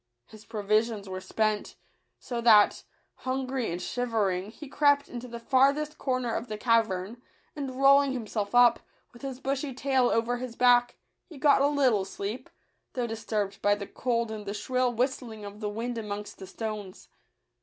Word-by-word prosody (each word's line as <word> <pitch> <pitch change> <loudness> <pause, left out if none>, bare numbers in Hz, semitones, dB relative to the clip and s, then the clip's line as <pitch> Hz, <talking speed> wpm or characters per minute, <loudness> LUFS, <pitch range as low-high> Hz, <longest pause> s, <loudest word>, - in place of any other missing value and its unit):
His 215 0 -15
provisions 215 0 0
were 185 0 -5
spent; 215 +1 -1 0.4
so 240 -2 -5
that, 215 -3 +5 0.3
hungry 260 -3 -2
and 175 - -3
shivering, 205 -3 -1
he 295 +6 -11
crept 285 0 +3
into 245 0 -7
the 235 -1 -7
far 260 +3 +4
thest 305 0 -5
corner 255 -3 -1
of 235 - -3
the 215 -2 -5
cavern, 225 -1 +1 0.3
and 270 -3 -5
rolling 275 0 +6
him 250 -4 -4
self 210 +1 -3
up, 245 -1 +6 0.3
with 240 - -15
his 270 -2 -6
bushy 270 0 -2
tail 265 -2 +2
over 230 +2 +1
his 245 -1 -6
back, 245 0 +4 0.3
he 320 - -11
got 280 -1 +4
a 280 - +5
little 265 -8 +2
sleep, 200 +6 -6 0.4
though 250 -2 -1
disturbed 215 -3 -3
by 205 0 +3
the 205 -1 -6
cold 235 -1 -1
and 210 -2 -7
the 200 - -3
shrill 255 +2 0
whistling 240 -3 -2
of 205 +1 -9
the 210 -1 -3
wind 230 +3 -4
amongst 210 -1 -6
the 190 - -8
stones. 210 -4 -6
235 Hz, 175 wpm, -28 LUFS, 210-260 Hz, 0.4 s, rolling